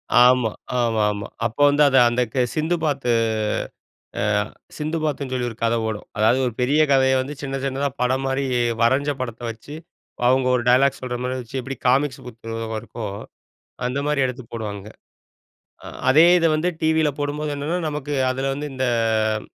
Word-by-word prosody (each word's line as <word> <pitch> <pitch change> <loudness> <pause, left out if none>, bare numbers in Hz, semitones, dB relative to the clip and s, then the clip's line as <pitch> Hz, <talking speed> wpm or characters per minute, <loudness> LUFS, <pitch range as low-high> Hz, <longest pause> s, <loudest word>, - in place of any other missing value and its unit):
ஆமா. 125 -1 +6 0.3
ஆமா, 115 -2 0
ஆமா. 100 0 -5 0.2
அப்ப 115 - -3
வந்து 145 +1 +4 0.3
அந்த 120 +1 0
க 130 -2 +2
சிந்து 160 +3 +1
பாத்து. 140 -5 0 1.1
அ - - 0 0.6
சிந்து 155 +2 -2
பாத்துன்னு 140 -3 -2
சொல்லி 125 -1 -1
ஒரு 115 - -13
கத 115 0 +2
ஓடும். 110 -1 -4
அதாவது 110 +5 +3
ஒரு 120 - -2
பெரிய 145 +5 +3
கதைய 130 -1 +4
வந்து 140 +3 -5
சின்ன 135 -1 -4
சின்னதா 135 +1 -1
படம் 130 +2 +1
மாரி 135 +1 0 0.4
வரஞ்ச 135 +5 +3
படத்த 120 -1 -5
வச்சு, 115 +6 -12 0.5
அவுங்க 130 0 +3
ஒரு 120 - -1
டயலாக் 135 +2 +4
சொல்ற 125 -1 -4
மாரி 130 +1 -2
வச்சு, 120 +3 -7
எப்பிடி 135 +2 -6
காமிக்ஸ் 135 +1 +2
புக் 115 -1 -6
இருக்கோ, 115 -1 -7 0.8
அந்தமாரி 140 +2 -1
எடுத்து 125 -1 -6
போடுவாங்க. 105 -3 -5 1.0
அ - - -7 0.2
அதே 155 +5 +7
இத 165 - +2
வந்து 170 +4 0
டிவி 160 0 +3
ல - - +2
போடும்போது 150 +1 -2
என்னன்னா 155 +5 -2
நமக்கு 145 -1 -4 0.2
அதுல 135 +1 -1
வந்து, 145 +1 -5
இந்த 130 0 -1 0.5
அ - - -9
130 Hz, 165 wpm, -22 LUFS, 120-145 Hz, 1.1 s, அதே